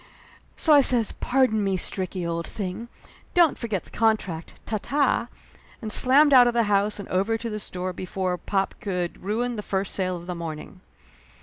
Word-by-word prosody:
So 315 - +4
I 290 - +8
says 245 -4 +4
"Pardon 250 -5 +1
me, 195 -1 0
Stricky, 185 -1 -3
old 170 0 -3
thing 200 +3 -5 0.5
don't 340 -4 +5
forget 215 -6 -3
the - - -18
contract 215 -7 -1
ta 215 - -2
ta!" 275 -4 +1 0.5
and 220 -2 -5
slammed 280 +5 +5
out 250 -2 +8
of 240 - 0
the 235 - +3
house 205 0 +1
and 200 - -7
over 200 +5 0
to 230 0 -5
the 215 - -4
store 185 -2 -5
before 185 0 -3
pop 195 -1 -1
could 180 -5 -3
ruin 230 +5 -2
the - - -3
first 195 -1 -2
sale 185 -2 -1
of 170 - -11
the 180 - -4
morning. 170 +1 -8
205 Hz, 185 wpm, -24 LUFS, 185-235 Hz, 0.5 s, I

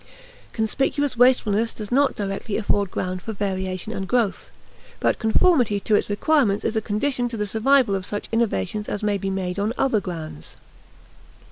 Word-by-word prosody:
Conspicuous 270 +5 0
wastefulness 230 -3 +3
does 210 -2 -8
not 275 +2 +3
directly 200 +1 -3
afford 205 -2 0
ground 185 0 -3
for 220 - -5
variation 190 0 -3
and 190 -2 -4
growth, 235 -4 0 0.5
but - - +1
conformity 225 - +3
to 215 - -1
its 205 - +2
requirements 210 -1 +2
is 225 - 0
a 220 - +1
condition 245 +4 -1
to 230 - -5
the 210 - -1
survival 235 +2 +3
of 190 -1 -1
such 205 +2 -5
innovations 210 - -1
as 205 - -3
may 205 -1 +1
be 195 - -2
made 190 -1 -3
on 210 +3 0
other 235 -6 +2
grounds. 160 - -7
210 Hz, 165 wpm, -23 LUFS, 195-235 Hz, 0.5 s, wastefulness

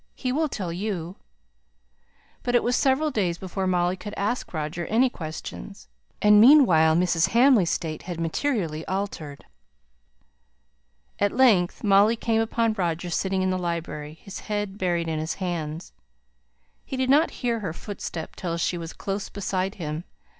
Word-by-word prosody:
He 255 - -2
will 310 +3 0
tell 185 -9 -4
you." 185 -2 -4 1.2
But 245 0 -1
it 240 - +4
was 245 +1 +1
several 280 +4 +2
days 185 -8 0
before 190 +1 -3
Molly 180 0 +1
could 205 +3 -8
ask 210 +5 -2
Roger 160 +1 -4
any 245 +4 +3
questions; 160 +4 -8 0.3
and 210 0 +7
meanwhile 185 - +6
Mrs. 175 -1 +2
Hamley's 240 -8 +5
state 155 -2 -3
had 175 -2 -6
materially 165 - -1
altered. 185 -7 -4 1.7
At 205 0 +2
length 215 -9 +3
Molly 205 +2 +5
came 225 -1 0
upon 225 0 +1
Roger 175 -3 -2
sitting 190 +2 0
in 185 - +1
the 185 - -1
library, 165 -3 -4
his 195 - -8
head 205 -1 -4
buried 175 -2 0
in 160 -1 -2
his 160 +2 -3
hands. 170 -3 -4 0.9
He 265 - -6
did 260 0 +1
not 305 +4 +5 0.2
hear 235 -1 +1
her 195 -6 -3
footstep 170 -2 -7
till 170 -2 -3
she 175 +1 -1
was 165 0 -7
close 195 0 -4
beside 195 -1 -2
him. 155 -2 -4
190 Hz, 155 wpm, -25 LUFS, 170-220 Hz, 1.7 s, and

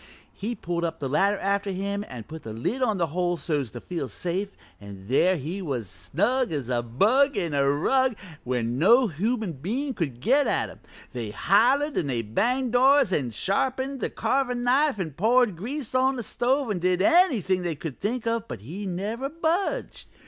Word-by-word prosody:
He'd 230 +4 -5
pulled 170 0 -2
the 140 - -3
ladder 195 +9 +2
up - - -9
after 200 0 0
him 200 +2 -2
an' 120 -3 -7
put 160 +6 -9
the 110 - -7
lid 170 - -2
on 220 -5 +1
the 170 - +2
hole 175 -1 0
so's 145 -7 -2
to 120 - -8
feel 165 0 -4
safe, 180 - -3 0.3
an' 100 -1 -11
there 180 - +3
he 165 +7 -5
was 130 - -3
snug 180 - -1
as 140 -6 -3
a 120 -1 +1
bug 220 - +2
in 165 -4 -1
a 140 -1 +2
rug 255 - +2
an' 170 -6 -14
where 125 -1 -1
no 180 - +4
human 215 +2 -1
bein' 235 - -3
could 145 - -3
get 270 - +3
at - - 0
him. - - -13 0.3
They 120 -4 -4
hollered 260 - +2
an' 115 -8 -3
banged 250 - +1
doors 265 -3 +5
an' 130 -7 0
sharpened 260 - -1
the - - -2
carvin' 250 -3 0
knife 270 +1 +3
an' 175 -5 -3
poured 225 - +3
grease 250 - -5
on 260 +1 +3
the 245 - -4
stove 255 +3 0
an' 190 - -1
did 180 +1 +1
anything 235 - +3
they 175 -3 -2
could 150 -2 -7
think 230 +4 -2
of, 230 -1 -1
but - - -7
he 180 - -6
never 210 +9 -3
budged. 335 - -2
195 Hz, 190 wpm, -26 LUFS, -, 0.3 s, doors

